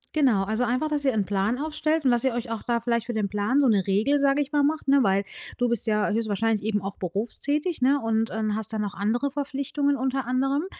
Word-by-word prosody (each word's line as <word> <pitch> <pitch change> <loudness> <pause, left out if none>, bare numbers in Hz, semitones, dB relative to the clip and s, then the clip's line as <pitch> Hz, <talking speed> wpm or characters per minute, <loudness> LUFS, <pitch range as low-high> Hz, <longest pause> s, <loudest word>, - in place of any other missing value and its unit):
Genau, 255 -10 +3
also 220 +5 -1
einfach, 255 +6 0
dass 295 -2 -2
ihr 265 - +4
'n 205 -2 +1
Plan 200 +4 0
aufstellt 305 +1 -1
und 255 - +5
dass 240 0 +2
ihr 265 -2 +1
euch 235 -1 -4
auch 225 - -3
da 235 -1 -1
vielleicht 235 0 -1
für 240 - -4
den 210 -2 -1
Plan 210 +7 0
so 280 - +4
'ne 205 -5 +2
Regel, 220 +9 +2
sage 280 +1 +2
ich 285 - -14
mal, 295 - +2
macht, 300 +1 0
ne? 275 +1 +5
Weil 195 -2 +2 0.3
du 245 - +1
bist 235 -1 +2
ja 210 -1 +1
höchstwahrscheinlich 220 -1 0
eben 210 -2 -1
auch 195 0 -6
berufstätig, 270 - -2
ne? 275 +3 +3
Und 225 -2 0
und 215 -1 -2
hast 220 0 -2
dann 220 -1 -2
noch 205 -1 -3
andere 235 +8 -1
Verpflichtungen 280 0 -1
unter 265 0 -1
anderem, 270 +5 0
240 Hz, 245 wpm, -25 LUFS, 215-280 Hz, 0.3 s, und